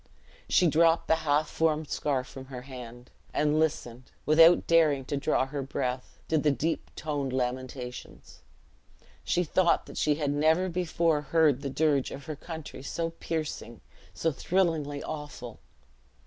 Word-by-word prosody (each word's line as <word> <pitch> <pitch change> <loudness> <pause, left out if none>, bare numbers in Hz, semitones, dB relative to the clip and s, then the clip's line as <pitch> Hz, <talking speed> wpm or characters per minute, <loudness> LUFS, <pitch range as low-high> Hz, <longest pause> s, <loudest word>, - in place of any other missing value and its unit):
She 180 - +4
dropped 165 +1 +3
the 160 - +3
half 155 -1 +1
formed 155 -1 0
scarf 135 -4 -1
from 130 +1 -10
her 130 -2 -8
hand; 125 -2 -10 0.2
and 150 +1 +2
listened, 125 -6 -2 0.2
without 165 +3 +6
daring 155 -5 +3
to 145 - -3
draw 140 -1 +1
her 140 +1 -4
breath, 130 -1 -4
to 160 - +2
the 150 - +2
deep 155 +3 -1
toned 145 -3 -3
lamentations. 125 0 -5 0.8
She 180 - +1
thought 175 +1 +2
that - - -11
she 150 -1 +2
had 145 -2 -1
never 160 +5 +2
before 165 -3 0
heard 150 -2 +2
the 140 - -3
dirge 145 -1 +1
of 140 - -9
her 155 -2 -5
country 160 -1 -8
so 165 +4 -3
piercing, 155 -8 -5 0.3
so 165 - -1
thrillingly 155 -4 0
awful. 145 -7 -7
150 Hz, 150 wpm, -28 LUFS, 135-160 Hz, 0.8 s, without